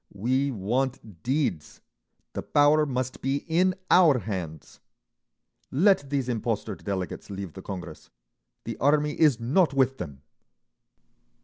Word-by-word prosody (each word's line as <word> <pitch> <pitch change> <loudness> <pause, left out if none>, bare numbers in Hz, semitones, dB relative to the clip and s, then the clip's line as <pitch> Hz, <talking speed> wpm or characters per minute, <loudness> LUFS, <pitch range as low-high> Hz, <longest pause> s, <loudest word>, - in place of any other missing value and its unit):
We 130 +7 +1
want 115 -3 -3
deeds—the 105 - -4
Power 150 +1 +3
must 130 -1 -3
be 135 +2 -1
in 180 +3 +2 0.2
our 165 -7 +6
hands!' 90 - -6 0.9
Let 160 -1 +3
these 135 -3 -1
impostor 115 -3 -2
delegates 95 -1 -5
leave 95 -4 -6
the 95 - -9
Congress! 95 -2 -8 0.5
The - - -5
Army 150 +2 +2
is 150 -7 +4
not 140 +5 +2
with 135 0 +2
them!" 70 -1 -7
130 Hz, 115 wpm, -26 LUFS, 100-145 Hz, 0.9 s, our